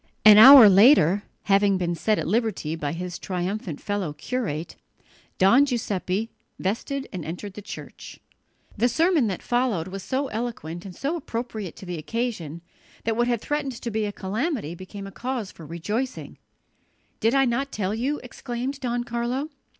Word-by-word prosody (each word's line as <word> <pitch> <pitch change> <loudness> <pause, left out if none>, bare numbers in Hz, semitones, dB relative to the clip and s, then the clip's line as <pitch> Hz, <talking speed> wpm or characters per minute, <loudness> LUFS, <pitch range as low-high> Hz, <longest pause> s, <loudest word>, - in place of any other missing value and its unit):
An 210 -1 +10
hour 260 -1 +11
later, 200 - +6 0.2
having 200 -1 +3
been 175 -1 -1
set 210 +6 0
at - - -2
liberty 215 -9 -1
by 150 -3 -3
his 180 +1 -5
triumphant 180 -2 -4
fellow 200 -7 -3
curate, 175 -6 -4 0.6
Don 215 +9 +6
Giuseppe 220 -5 -2 0.3
vested 265 +8 -3
and 180 -3 -5
entered 180 +5 -6
the 210 - -8
church. 205 - -10 0.6
The 240 +4 +2
sermon 320 -2 +2
that 190 -3 -4
followed 240 -9 0
was 195 +1 -6
so 265 +8 -2
eloquent 210 -7 -5
and 185 -3 -9
so 285 +5 -2
appropriate 230 - -5
to - - -11
the 175 -2 -5
occasion 175 -5 -4 0.4
that 225 0 0
what 240 +1 +1
had 240 -3 0
threatened 295 -2 -2
to 235 0 -6
be 215 0 -1
a 205 - -3
calamity 210 - -3
became 185 +3 -9
a 195 - -8
cause 245 -2 -4
for 160 - -12
rejoicing. 210 - -4 0.8
"Did 225 +2 +2
not 270 -3 +3
I 255 +3 +1
tell 210 -7 -3
you?" 265 +7 -1
exclaimed 250 +2 -5
Don 245 -2 -2
Carlo. 240 +5 -3
215 Hz, 165 wpm, -24 LUFS, 185-250 Hz, 0.8 s, hour